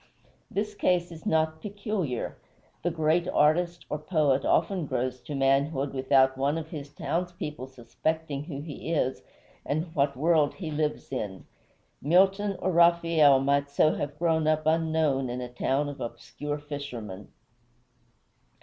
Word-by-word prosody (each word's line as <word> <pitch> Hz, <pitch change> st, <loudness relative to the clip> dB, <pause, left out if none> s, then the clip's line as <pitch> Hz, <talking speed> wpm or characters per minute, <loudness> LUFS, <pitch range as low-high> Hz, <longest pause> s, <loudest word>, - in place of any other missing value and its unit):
This 210 Hz, +1 st, -2 dB
case 180 Hz, -3 st, +1 dB
is 165 Hz, -1 st, -9 dB
not 160 Hz, 0 st, +1 dB
peculiar. 200 Hz, -, -3 dB, 0.5 s
The 175 Hz, -, 0 dB
great 165 Hz, +1 st, +1 dB
artist 175 Hz, +2 st, +2 dB
or 150 Hz, -, -3 dB
poet 150 Hz, -4 st, +1 dB
often 185 Hz, -6 st, +1 dB
grows 125 Hz, 0 st, -2 dB
to 145 Hz, -, -6 dB
manhood 135 Hz, +1 st, +1 dB
without 130 Hz, 0 st, +3 dB
one 140 Hz, +3 st, +1 dB
of 160 Hz, -1 st, -5 dB
his 145 Hz, -4 st, -6 dB
townspeople 150 Hz, -3 st, -4 dB
suspecting 140 Hz, +4 st, -3 dB
who 145 Hz, -4 st, -6 dB
he 155 Hz, +1 st, -6 dB
is, 130 Hz, -4 st, 0 dB, 0.4 s
and 160 Hz, +3 st, -2 dB
what 140 Hz, -3 st, +1 dB
world 155 Hz, 0 st, +3 dB
he 170 Hz, -5 st, -5 dB
lives 150 Hz, 0 st, -2 dB
in. 105 Hz, -7 st, -4 dB, 0.6 s
Milton 195 Hz, +6 st, +3 dB
or 185 Hz, -, -1 dB
Raphael 165 Hz, -5 st, +5 dB
might 140 Hz, +1 st, +1 dB
so 155 Hz, +2 st, +3 dB
have 145 Hz, 0 st, -4 dB
grown 160 Hz, -1 st, +1 dB
up 155 Hz, 0 st, +2 dB
unknown 155 Hz, -4 st, +1 dB
in 125 Hz, +1 st, -3 dB
a 125 Hz, -1 st, -5 dB
town 135 Hz, +3 st, 0 dB
of 145 Hz, -1 st, -7 dB
obscure 145 Hz, +5 st, -5 dB
fishermen. 125 Hz, -9 st, -7 dB
150 Hz, 140 wpm, -27 LUFS, 135-165 Hz, 0.6 s, Raphael